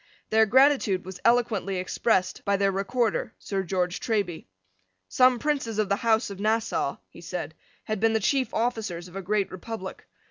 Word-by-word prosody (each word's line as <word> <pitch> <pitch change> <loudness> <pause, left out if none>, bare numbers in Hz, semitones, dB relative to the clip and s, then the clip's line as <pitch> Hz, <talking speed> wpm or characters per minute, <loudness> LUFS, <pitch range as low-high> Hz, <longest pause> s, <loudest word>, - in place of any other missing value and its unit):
Their 220 0 +5
gratitude 255 -6 +4
was 185 -1 -8
eloquently 230 -5 +2
expressed 185 +1 0
by 200 0 +1
their 195 0 +2
Recorder, 215 +3 -1
Sir 195 -1 -3
George 180 -1 -1
Treby. 200 - -2 0.6
Some 255 - +4
princes 270 -5 -1
of 215 -2 +1
the 200 - +2
House 225 -1 +1
of 195 - -8
Nassau, 220 +2 0
he - - -14
said, - - -5 0.3
had 215 -2 -3
been 225 +1 +3
the 220 - +2
chief 260 +3 +1
officers 220 -7 -2
of 180 - -14
a 195 - -3
great 200 0 0
republic. 190 +1 -7
215 Hz, 170 wpm, -26 LUFS, 190-230 Hz, 0.6 s, Their